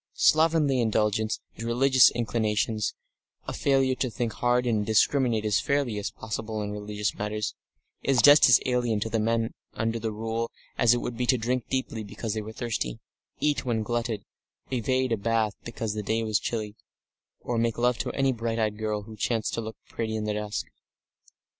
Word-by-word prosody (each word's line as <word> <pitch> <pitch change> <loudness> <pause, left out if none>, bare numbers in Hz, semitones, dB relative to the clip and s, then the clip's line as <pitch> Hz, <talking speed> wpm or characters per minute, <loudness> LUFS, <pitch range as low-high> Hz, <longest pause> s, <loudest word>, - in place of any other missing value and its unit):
Slovenly 155 -4 +4
indulgence 110 -1 +1
in 115 - -6
religious 130 +2 +6
inclinations, 110 -2 -1 0.5
a - - -3
failure 135 -1 +2
to 130 0 -1
think 115 -1 -3
hard 125 0 +1
and 110 -3 +1
discriminate 110 +1 +2
as 105 -3 +3
fairly 130 - 0
as 100 - -3
possible 110 0 -5
in 105 - -4
religious 105 0 -3
matters, 105 +1 -3 0.5
is 135 -2 +2
just 145 +2 +8
as 125 - +8
alien 120 -4 +1
to 110 - -1
the 115 - +1
men 115 +1 0 0.2
under 115 +1 -1
the 110 0 -2
Rule 115 +2 -3 0.3
as 120 0 +4
it 120 - -2
would 120 - -4
be 125 0 -1
to 130 - +4
drink 125 +1 -1
deeply 130 -4 -2
because 105 +1 -5
they 110 - -2
were 110 +1 -7
thirsty, 110 - -3 0.4
eat 150 -1 +1
until 115 -4 0
glutted, 115 -2 -2 0.5
evade 130 +1 +1
a 115 - +2
bath 110 0 +1
because 115 -2 -4
the 105 - -3
day 110 +2 0
was 110 -1 +1
chilly, 110 -3 -3 0.7
or 120 -1 -1
make 115 -1 0
love 120 0 +2
to - - -2
any 135 -1 +2
bright 115 -1 -2
eyed 110 -2 -1
girl 105 -1 -2
who 110 +1 -10
chanced 110 +1 -1
to 115 - -1
look 110 0 -7
pretty 110 -1 -3
in 110 - -2
the 105 0 -1
dusk. 105 0 -3
115 Hz, 185 wpm, -27 LUFS, 110-125 Hz, 0.7 s, just